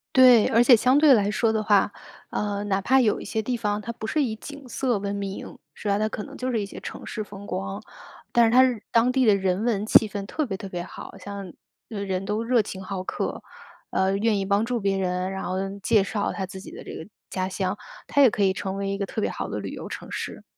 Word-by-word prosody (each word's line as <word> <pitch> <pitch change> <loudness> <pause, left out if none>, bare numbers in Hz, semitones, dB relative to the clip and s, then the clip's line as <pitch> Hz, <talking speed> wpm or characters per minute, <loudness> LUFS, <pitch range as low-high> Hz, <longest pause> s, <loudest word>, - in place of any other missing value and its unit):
对， 250 -4 +8
而 230 - +4
且 240 0 +8
相 255 +4 +3
对 295 -1 +7
来 205 -5 +4
说 220 +2 +1
的 220 - +1
话， 205 -1 +3 0.4
呃， 205 -1 -2
哪 195 -1 +1
怕 265 +7 +4
有 220 -5 +2
一 - - -7
些 220 - -2
地 245 +3 -1
方， 210 -2 -1
它 235 +2 -5
不 220 - -6
是 300 +6 +1
以 225 -5 -1
景 285 +3 -10
色 245 -1 0
闻 200 0 -2
名， 200 -1 -6 0.2
是 210 - -5
吧？ 200 0 +2
它 215 +1 +1
可 215 - -5
能 - - -10
就 255 0 -2
是 225 - +1
一 - - -2
些 200 - -9
城 - - -8
市 215 - -4
风 200 0 -11
光， 195 +2 -4 0.5
但 235 -1 +5
是 225 - +1
它 255 +1 +7
是 250 -4 +2
当 235 +2 +4
地 255 -1 +2
的 210 - +6
人 190 +1 0
文 215 -4 +1
气 220 0 +6
氛 205 -1 -5
特 295 +9 -2
别 195 -5 -3
特 195 - -7
别 175 -2 -4
好。 - - -10
像 200 -3 -7 0.4
人 195 -3 -3
都 210 +3 -1
热 240 -1 +3
情 195 -2 -7
好 190 -1 -4
客， - - -3 0.5
呃， 190 +1 +1
愿 215 0 +2
意 195 - -1
帮 200 +2 +2
助 245 +1 -1
别 195 -2 0
人， 185 0 -1
然 190 - -4
后 185 - -2 0.3
介 205 0 +4
绍 205 0 -1
他 190 - -3
自 190 0 -9
己 195 - -10
的 - - -10
这 - - -8
个 - - -7 0.2
家 185 0 -2
乡， 190 +1 -2 0.3
它 285 - +3
也 260 - +7
可 205 - +1
以 190 - +4
成 190 0 -4
为 200 0 -2
一 195 - -1
个 200 0 -2
特 220 - -4
别 - - 0
好 - - -4
的 - - -3
旅 - - -5
游 - - -7
城 - - -7
市。 - - -5
205 Hz, 280 characters per minute, -25 LUFS, 195-230 Hz, 0.5 s, 对